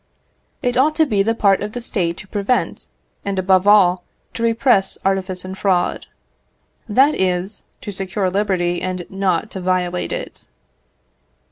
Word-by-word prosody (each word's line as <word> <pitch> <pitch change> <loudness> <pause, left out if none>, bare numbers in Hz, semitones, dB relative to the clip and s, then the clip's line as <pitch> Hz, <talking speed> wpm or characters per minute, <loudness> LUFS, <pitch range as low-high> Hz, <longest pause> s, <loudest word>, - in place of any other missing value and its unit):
It 245 -1 0
ought 300 +4 +3
to 315 0 +4
be 210 -8 +1
the 225 +3 +1
part 200 -3 +3
of 210 +1 -4
the 245 - -4
State 180 -7 -2
to 195 - -9
prevent, 205 +4 -1 0.4
and, 200 -1 -3
above 185 +1 +3
all, 185 -4 +5 0.3
to - - -6
repress 230 -4 +2
artifice 190 -1 -1
and 190 0 -6
fraud; 190 -2 0 0.8
that 270 +8 +4
is, 185 +2 -1 0.2
to 205 - -6
secure 190 0 -2
liberty, 185 -3 0
and 185 -1 -3
not 195 +1 -1
to 190 - -6
violate 180 -1 -1
it. - - -6
195 Hz, 150 wpm, -19 LUFS, 185-210 Hz, 0.8 s, all